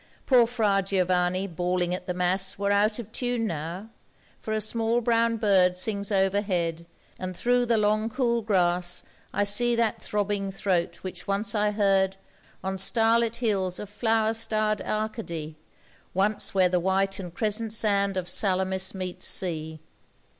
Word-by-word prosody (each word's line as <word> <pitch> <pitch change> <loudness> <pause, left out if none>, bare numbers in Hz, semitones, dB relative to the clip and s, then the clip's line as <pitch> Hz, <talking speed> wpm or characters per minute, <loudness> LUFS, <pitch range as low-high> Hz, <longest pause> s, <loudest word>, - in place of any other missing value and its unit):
Poor 245 -3 +5
Fra 215 -5 +1
Giovanni 185 -1 +1
bawling 180 0 -1
at 180 0 -5
the 180 - -1
Mass 185 +1 0
Were 200 +1 0
out 210 +1 +2
of 225 -3 -8
tune 245 -1 -1
now, 175 +4 -5 0.5
for 220 - -6
a 215 - +1
small 225 +2 0
brown 230 -1 +2
bird 190 -4 +3
Sings 200 +1 -2
overhead, 190 -4 0 0.3
and 185 -1 -5
through 245 0 +2
the 230 -1 +3
long 215 +1 +1
cool 235 -1 0
grass 180 -4 +1 0.3
I 205 - +1
see 235 +4 +3
that 230 -2 0
throbbing 205 -1 -1
throat 180 -3 -1
which 185 -2 -7
once 200 +1 0
I 210 -1 +2
heard 195 -2 +2 0.5
On 190 0 -3
starlit 230 +3 +3
hills 195 -7 0
of 210 - -7
flower 220 0 +1
starred 215 -2 -1
Arcady, 215 -8 -4 0.6
Once 200 +1 0
where 185 -1 +5
the 180 0 +1
white 190 +2 0
and 180 -3 -6
crescent 215 +4 -1
sand 200 -3 +1
of 180 -1 -3
Salamis 190 0 +1
meets 185 -1 -4
sea. 160 -3 -1
200 Hz, 155 wpm, -26 LUFS, 185-220 Hz, 0.6 s, Poor